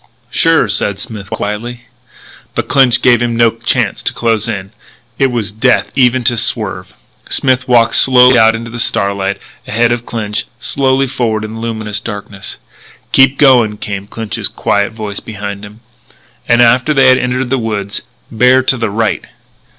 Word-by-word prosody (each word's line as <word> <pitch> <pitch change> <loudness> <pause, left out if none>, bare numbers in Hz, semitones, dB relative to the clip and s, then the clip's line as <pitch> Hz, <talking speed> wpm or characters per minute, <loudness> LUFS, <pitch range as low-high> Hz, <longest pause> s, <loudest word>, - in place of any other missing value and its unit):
"Sure," 165 -7 +3
said 100 -1 -1
Smith 105 -5 -8
quietly. 115 +4 -5 0.7
But - - -2
Clinch 130 -3 +3
gave 120 -2 +4
him 120 -1 -1
no 115 -1 +3
chance 115 +1 -1
to - - 0
close 115 -1 0
in: 100 -3 -5 0.5
it 135 - +4
was 115 -4 -2
death 110 +5 +1
even 130 -1 +2
to 120 0 +3
swerve. - - -1 0.3
Smith 130 -1 +1
walked 120 -2 +3
slowly 125 -1 +6
out 115 -1 +4
into 115 0 -7
the 120 - -7
starlight, 100 -2 -1 0.3
ahead 115 +2 +1
of 120 0 -3
Clinch 105 -2 -3
slowly 135 +2 +1
forward 115 -4 -2
in 110 - -8
the 115 - -7
luminous 110 -3 -3
darkness. 100 -3 -7 0.5
"Keep 135 0 +4
going," 120 -7 +4
came 100 -1 -6
Clinch's 110 0 -3
quiet 100 +2 -1
voice 105 -2 -6
behind 100 -1 -7
him. 105 +2 -12 0.7
And, 120 +1 +5
after 125 +6 +2
they 135 -1 +5
had 130 0 +4
entered 125 0 -2
the 135 - +1
woods, 105 -3 -3 0.3
"Bear 125 +3 +3
to 130 - +1
the 115 -2 -2
right." 110 +2 -1
115 Hz, 165 wpm, -13 LUFS, 105-125 Hz, 0.7 s, slowly